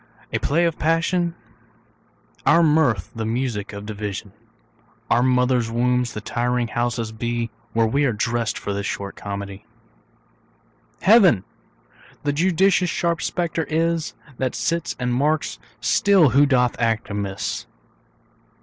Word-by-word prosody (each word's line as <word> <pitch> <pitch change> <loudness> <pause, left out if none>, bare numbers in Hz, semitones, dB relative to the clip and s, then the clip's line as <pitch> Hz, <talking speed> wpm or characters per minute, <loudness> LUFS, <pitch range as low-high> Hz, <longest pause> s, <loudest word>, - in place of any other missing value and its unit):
A 115 - +1
play 165 +9 +2
of 165 -2 -1
passion, 170 +2 +1 1.1
Our 170 +1 +5
mirth 145 - +2
the 115 - -3
music 115 -2 -2
of 100 0 -8
division, 105 -1 -5 0.8
Our 120 - +4
mother's 125 -2 +2
wombs 125 +1 +1
the 105 - -5
tiring 120 +1 -1
houses 120 -1 -2
be, 115 +1 -3 0.2
Where 115 0 +3
we 140 +6 +1
are 130 - +2
dressed 115 0 -1
for 100 - -4
this 100 0 -3
short 100 0 -4
comedy. 100 -1 -7 1.4
Heaven 185 - +6 0.8
the 145 -1 0
judicious 180 +3 +3
sharp 170 0 -1
spectator 170 -2 -2
is, 165 0 0 0.2
That 130 -1 -1
sits 170 0 -1
and 125 -1 -1
marks 150 +4 0 0.2
still 195 -7 +4
who 140 +4 +5
doth 125 -3 +2
act 115 -2 0
amiss. 100 -1 -3
125 Hz, 130 wpm, -22 LUFS, 110-160 Hz, 1.4 s, Heaven